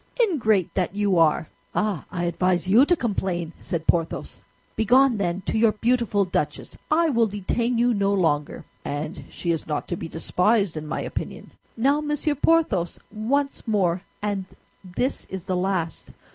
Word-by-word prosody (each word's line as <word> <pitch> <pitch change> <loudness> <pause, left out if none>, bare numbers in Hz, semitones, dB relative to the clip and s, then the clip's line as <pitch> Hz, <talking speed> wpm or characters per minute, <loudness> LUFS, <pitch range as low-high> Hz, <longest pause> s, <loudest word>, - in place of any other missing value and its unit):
"Ingrate 225 - +2
that 185 0 -1
you 200 -4 +2
are!" 160 -1 +3 0.3
"Ah! 205 -8 0
I 175 -1 -2
advise 175 +1 +1
you 235 +9 +6
to 355 - +4
complain!" 185 - -2
said 170 -3 -3
Porthos. 165 -1 -1 0.3
"Begone, 245 +3 +4
then, 180 -1 -1
to 220 - -1
your 225 -1 +4
beautiful 230 -3 +1
duchess; 180 - -3
I 320 +1 +3
will 230 -3 +3
detain 230 +4 -1
you 240 +1 +3
no 200 -2 +1
longer." 160 -7 0 0.2
"And 150 +5 -4
she 170 - -2
is 165 - -2
not 150 -2 -2
to 175 - -1
be 170 - -6
despised, 180 +4 +1
in 155 0 -5
my - - -2
opinion." - - -6 0.3
"Now, 280 +6 +3
Monsieur 295 0 0
Porthos, 290 - +2
once 265 +7 -1
more, 185 -5 +1 0.2
and 200 -2 -1 0.4
this 195 +9 -2
is 190 -2 -6
the 185 0 -2
last! 180 -3 -2
200 Hz, 160 wpm, -24 LUFS, 175-235 Hz, 0.4 s, you